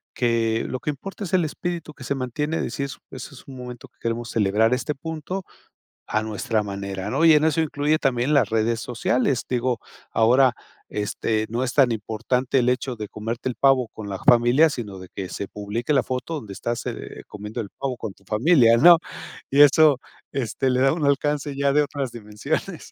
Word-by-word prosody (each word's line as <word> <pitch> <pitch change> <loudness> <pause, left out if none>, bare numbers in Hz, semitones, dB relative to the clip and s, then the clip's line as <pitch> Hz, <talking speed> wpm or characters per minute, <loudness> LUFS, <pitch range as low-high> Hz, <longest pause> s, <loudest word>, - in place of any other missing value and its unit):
que 115 -2 +1
lo 130 - -4
que 150 - -4
importa 195 +8 -7
es 180 - -8
el 185 -2 +4
espíritu 170 0 -4
que 130 - -12
se 140 - -1
mantiene, 150 +5 -2
decir: 140 +4 -3 0.3
"Eso 130 +1 -8
es - - -15
un 135 -1 -9
momento 125 -1 -8
que - - -43
queremos 115 +1 -2
celebrar, 110 +2 +2
este 130 +4 -1
punto 160 +5 -5 0.6
a 110 - 0
nuestra 110 0 -1
manera", 100 -1 -5
¿no? 145 +6 +1
Y 165 - +8
en 150 0 +4
eso 160 0 +2
incluye 150 0 +1
también 130 +3 +1
las 140 - +3
redes 115 +1 +1
sociales. 125 +2 0
Digo, 125 -2 0 0.3
ahora, 125 +3 +5 0.4
este, 110 +1 -1
no 120 +3 -1
es 125 - -2
tan 135 -4 +4
importante 115 +4 -1
el 120 - +1
hecho 125 +1 0
de 105 -1 -6
comerte 115 +5 -4
el 125 - -3
pavo 135 -4 +3
con 110 -2 -9
la 95 - -4
familia, 120 +6 +5
sino, 105 -8 -6
de 95 - -10
que 95 -2 -5
se 100 - -5
publique 105 +7 -3
la 135 - +4
foto 130 +6 -3
donde 110 -10 -6
estás, 120 +4 -3
eh, - - -6
comiendo 105 +3 -6
el 100 - -10
pavo 135 -2 -3
con 110 -4 -6
tu 100 - -27
familia, 115 - +4
¿no? 170 +7 +8 0.5
Y 140 +2 +6
eso, 145 -1 +6 0.3
este, 135 0 -1
le 125 - +1
da 135 +2 +4
un 160 -2 -1
alcance 145 0 0
ya 140 0 +2
de 150 - +4
otras 140 -3 -4
dimensiones. 105 -2 -4
125 Hz, 200 wpm, -23 LUFS, 110-140 Hz, 0.6 s, Y